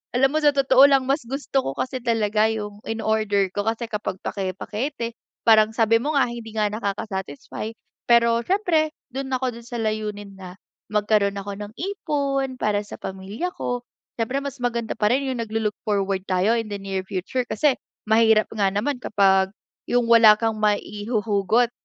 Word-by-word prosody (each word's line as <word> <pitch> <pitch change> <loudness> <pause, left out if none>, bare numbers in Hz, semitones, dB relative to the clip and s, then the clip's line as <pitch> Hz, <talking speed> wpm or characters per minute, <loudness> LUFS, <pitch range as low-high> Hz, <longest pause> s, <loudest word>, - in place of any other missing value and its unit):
alam 270 +3 +3
mo 310 - +1
sa 295 - +6
totoo 275 0 +6
lang, 270 -2 +3
mas 275 +3 +1
gusto 275 0 -1
ko 135 - -3
kasi 255 0 -3
talaga 220 -2 +2
yung 210 -2 -5
ino-order 220 -3 0
ko. 205 - 0
Kasi 230 +1 -1
kapag 210 -3 -4
pake-pakete, 220 +6 -3 0.3
parang 220 -1 +6
sabi 230 0 +3
mo 300 +1 -1
nga, 275 - +4
hindi 235 -2 -7
nga 215 -1 +2
nakaka-satisfy 200 -3 -4 0.4
pero 235 0 +5
siyempre 345 - +1 0.2
do'n 270 0 -4
ako, 260 +1 -2
do'n 235 0 -12
sa 240 - -5
layunin 210 -2 -3
na 185 -1 -10 0.4
magkaroon 205 -1 +2
ako 200 +1 -6
ng 205 +1 -7
ipon, 280 -8 -1
para 210 -1 +1
sa - - -10
pamilya 195 - -5
ko. 245 0 -2 0.4
Siyempre 255 +5 -1
mas 280 -2 -6
maganda 235 -2 -2
pa 210 - +2
rin 270 +2 +2
yung 260 -2 -2
naglo-look 220 -1 -2
forward 195 -2 0
tayo 185 +3 +2
in 225 - -4
the 205 - -4
near 195 -1 -3
future 200 +6 -2
kasi 295 -4 +2 0.3
mahirap 220 -1 +4
nga 205 -3 +1
naman 250 +6 -1
kapag, 190 -3 +3 0.4
yung 245 0 +2
wala 225 -2 +8
kang 225 -1 -1
maihuhugot 210 +1 +1
220 Hz, 170 wpm, -23 LUFS, 205-255 Hz, 0.4 s, wala